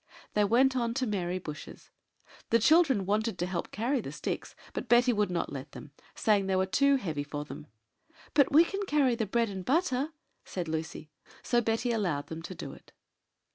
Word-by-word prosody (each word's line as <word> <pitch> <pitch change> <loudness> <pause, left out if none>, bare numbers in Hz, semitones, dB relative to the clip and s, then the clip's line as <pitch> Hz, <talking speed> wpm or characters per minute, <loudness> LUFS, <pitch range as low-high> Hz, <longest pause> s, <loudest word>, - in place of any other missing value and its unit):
They 210 - +3
went 260 +5 +4
on 235 -2 0
to 260 - 0
Mary 185 -5 -1
Bush's. 150 -5 -9 0.6
The 230 - +5
children 270 - +4
wanted 215 +1 0
to 175 - -1
help 180 -1 -3
to - - -18
carry 245 +4 +1
the 135 - -7
sticks, 150 0 -4 0.2
but 240 - -5
Betty 245 +1 +5
would 210 -3 +1
not 175 -4 -2
let 135 -1 -7
them, 145 - -10 0.2
saying 205 -3 +2
they 190 - +1
were 190 0 +2
too 280 +8 +3
heavy 160 - -2
for 145 0 -5
them. 150 - -9 0.7
"But 280 -3 +4
we 315 +4 +7
can 395 +3 -3
carry 280 -6 +3
the 225 -2 -1
bread 230 +1 +1
and 190 -1 -5
butter," 280 - +1 0.3
said 180 -3 -5
Lucy; 160 -1 -5 0.3
so 240 -1 +2
Betty 225 +2 0
allowed 175 -11 -1
them 160 0 -6
to 180 +2 -7
do - - -7
it. - - -17
210 Hz, 200 wpm, -30 LUFS, 175-250 Hz, 0.7 s, we